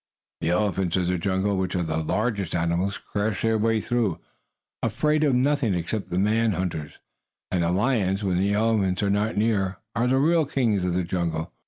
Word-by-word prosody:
The 80 - -1
elephants 95 -1 +1
of 90 - +1
the 90 0 0
jungle, 95 +2 0
which 95 0 -1
are 90 - 0
the 80 0 -1
largest 100 +1 -1
animals, 85 +4 0
crash 105 -1 -3
their 115 -1 +2
way 115 +1 +2
through, 110 -6 -1 0.6
afraid 150 0 +1
of 140 -4 +3
nothing 130 -5 +2
except 90 +5 -3
the 90 - -2
men 110 +3 +2
hunters. 80 -5 -3 0.6
And 90 - +1
the 85 - +1
lions, 100 -1 +1
when 90 -2 +1
the 100 +2 +1
elephants 105 -4 +1
are 100 - +2
not 105 +2 0
near, 100 -3 +1 0.2
are 120 +1 +1
the 130 +1 +3
real 160 +2 +3
kings 110 -9 +1
of 90 -1 0
the 90 - +1
jungle. 85 -2 -2
100 Hz, 190 wpm, -25 LUFS, 90-115 Hz, 0.6 s, of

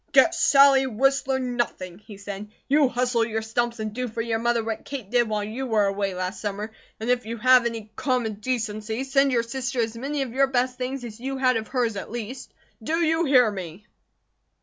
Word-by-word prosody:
"Get - - +6
Sally 275 -1 +5
Whistler, 265 +2 +1
nothing!" 240 -8 -3
he 210 -1 -12
said. 200 +1 -7 0.2
"You 285 0 +4
hustle 245 -2 +1
your 220 -1 -2
stumps 235 +1 -1
and 215 -1 -4
do 250 +2 -2
for 225 0 -7
your 225 -1 -1
mother 235 0 +1
what 225 0 -4
Kate 250 -8 -7
did 240 -2 +3
while 210 -1 -1
you 235 +6 -4
were 215 -3 +3
away 195 -1 -1
last 185 +1 -4
summer. 210 +1 -4 0.3
And 220 - -5
if 245 -2 0
you 230 +1 -4
have 250 +1 +5
any 225 -2 -6
common 245 -6 -1
decency 220 0 -2
send 275 0 +2
your 235 -2 +2
sister 250 +2 -3
as 225 -1 0
many 275 +4 -2
of 245 -3 -7
your 275 +1 +3
best 255 -1 0
things 255 +1 -3
as 230 -2 -8
you 270 +2 -4
had 255 -1 +3
of 220 -1 -2
hers, 240 -5 -1
at - - -6
least. 240 +2 -6 0.3
Do 315 +9 -1
you 325 0 +2
hear 250 -6 +5
me?" 185 0 -8
235 Hz, 210 wpm, -25 LUFS, 215-260 Hz, 0.3 s, Get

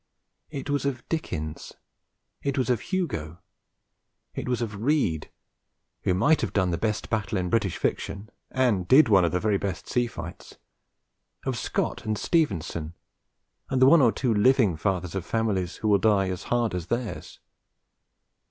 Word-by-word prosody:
It 140 -2 -6
was 145 0 0
of 135 -3 -3
Dickens. 80 - -4 0.7
It 140 -1 -2
was 125 -2 +1
of 120 - +1
Hugo. 110 - -3 1.0
It - - -4
was 125 - 0
of 105 -3 -4
Reade, 120 - +1 0.8
who 90 - +2
might 150 - +3
have - - -2
done 95 -3 +2
the 85 - 0
best 110 -1 -2
battle 110 -2 -1
in 90 -1 -2
British 105 -6 +1
fiction 100 +2 -3 0.2
(and 115 -9 +1
did 135 -1 +7
one 95 -4 +6
of 85 - +2
the 90 - 0
very 105 0 +1
best 100 -2 -4
sea 120 -1 +1
fights), 85 -6 -9 0.9
of - - -1
Scott - - -2
and 110 -1 -1
Stevenson 85 - -1 0.7
and 130 - 0
the 130 - +7
one 160 +3 +7
or 120 -4 +5
two 120 -1 0
living 110 - +4
fathers 90 0 -2
of 95 -3 -3
families 100 -4 -1
who 110 - -3
will 100 -2 +4
die 100 -3 +3
as 90 -1 -5
hard 120 -3 0
as 90 -2 -4
theirs. 120 -1 -4
110 Hz, 165 wpm, -26 LUFS, 90-125 Hz, 1.0 s, did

